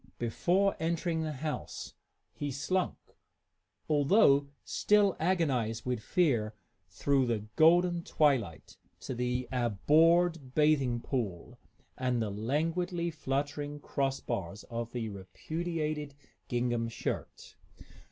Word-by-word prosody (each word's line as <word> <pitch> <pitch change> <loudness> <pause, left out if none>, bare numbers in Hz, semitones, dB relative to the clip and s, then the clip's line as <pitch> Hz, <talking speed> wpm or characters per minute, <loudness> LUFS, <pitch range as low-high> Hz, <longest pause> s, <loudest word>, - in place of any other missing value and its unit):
Before 180 - +1
entering 165 0 -1
the 155 -1 -2
house, 150 - -5 0.4
he 145 - -4
slunk, 175 +7 -1 0.9
although 145 -1 +4 0.2
still 205 -2 +3
agonized 140 -11 0
with 125 -3 -1
fear, 115 -10 +1 0.3
through 135 +7 +1
the 110 -3 -1
golden 175 +2 +5
twilight 130 - 0 0.2
to - - -4
the 125 +1 -1
abhorred 150 - +3
bathing 140 -6 +3
pool 115 -2 -4 0.4
and 125 -2 0
the 110 -3 -1
languidly 165 - -1
fluttering 145 0 -3
cross 135 -2 -1
bars 100 +2 -4
of 115 0 -4
the 120 -2 -3
repudiated 150 - -4 0.3
gingham 120 -2 0
shirt. 115 - -5
140 Hz, 105 wpm, -31 LUFS, 120-165 Hz, 0.9 s, golden